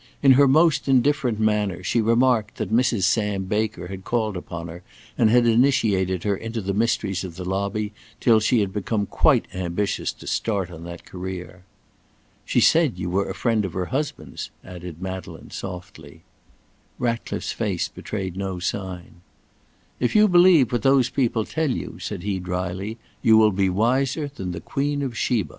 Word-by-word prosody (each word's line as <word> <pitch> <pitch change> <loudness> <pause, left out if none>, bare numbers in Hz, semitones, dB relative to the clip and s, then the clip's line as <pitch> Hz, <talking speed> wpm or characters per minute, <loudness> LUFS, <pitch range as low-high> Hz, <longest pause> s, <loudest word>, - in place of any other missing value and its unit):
In 135 - +7
her 140 +2 +6
most 155 +3 +3
indifferent 135 -3 +2
manner 105 -4 0
she 115 +6 +1
remarked 115 -1 +2
that - - -4
Mrs. 120 -4 +2
Sam 105 -1 +1
Baker 105 -1 -2
had 95 +1 -8
called 110 -3 -1
upon 85 -1 -6
her 85 +1 -9 0.3
and 115 -3 +3
had 120 +1 +4
initiated 110 -7 +2
her 100 -1 +1
into 115 +3 -5
the 100 -1 -2
mysteries 105 -3 0
of 90 -3 -7
the 90 - -6
lobby 100 +3 -2 0.3
till 115 -3 +5
she 110 +1 +2
had 95 -2 -2
become 105 0 -1
quite - - +3
ambitious 95 +2 -2
to - - -14
start 100 -5 -1
on 85 -1 -9
that 85 0 -9
career. 90 -1 -7 0.8
"She - - +1
said 160 - +4
you 90 -1 -3
were 100 +2 0
a 95 - -4
friend 110 +1 +1
of 95 - -4
her 90 -1 -2
husband's," 145 +2 -4 0.2
added 90 -1 -9
Madeleine 95 0 -7
softly. 90 -2 -8 0.8
Ratcliffe's 115 -1 -2
face - - -1
betrayed 95 -4 -5
no 95 -1 -3
sign. 90 -1 -5 0.8
"If 125 - 0
you 215 0 +7
believe 175 - +6
what 120 - 0
those 135 -2 +3
people 115 -4 0
tell 160 -2 -1
you," 90 - -4
said 95 -1 -5
he 100 -2 -1
drily, 90 +4 -4 0.2
"you 110 -1 +6
will 110 -1 +5
be 95 0 +1
wiser 130 - 0
than 95 -9 -5
the 85 -1 -6
Queen 145 - -2
of 130 -4 -4
Sheba." 115 -4 0
105 Hz, 170 wpm, -23 LUFS, 95-120 Hz, 0.8 s, In